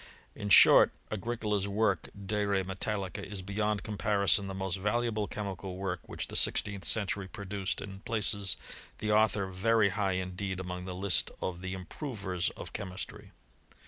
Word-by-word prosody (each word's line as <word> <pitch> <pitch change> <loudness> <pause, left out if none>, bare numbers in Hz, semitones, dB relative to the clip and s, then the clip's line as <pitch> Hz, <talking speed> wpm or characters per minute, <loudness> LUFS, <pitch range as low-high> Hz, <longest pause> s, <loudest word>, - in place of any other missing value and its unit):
In 105 - -5
short, - - +9 0.2
Agricola's 105 -2 -1
work 100 -4 +1 0.2
De 105 +1 0
Re 100 -1 +1
Metallica 95 +1 -3
is 100 -2 -6
beyond 105 +2 -1
comparison 100 -1 +2
the 95 - -5
most 95 -1 -2
valuable 105 +1 0
chemical 95 -3 -5
work 95 -2 -2
which - - -3
the - - -9
sixteenth 100 -3 +1
century 100 -2 +1
produced, 100 -1 -3
and 100 0 -8
places 100 -3 +1 0.4
the 105 - -1
author 105 -2 +3
very 100 +3 +2
high 100 -2 0
indeed 95 +1 -3
amotig 90 0 -5
the 90 - -4
list 95 0 +1
of 90 -1 -4
the 95 0 -4
improvers 95 - -3
of - - -8
chemistry. 95 -2 -6
100 Hz, 150 wpm, -31 LUFS, 95-105 Hz, 0.4 s, short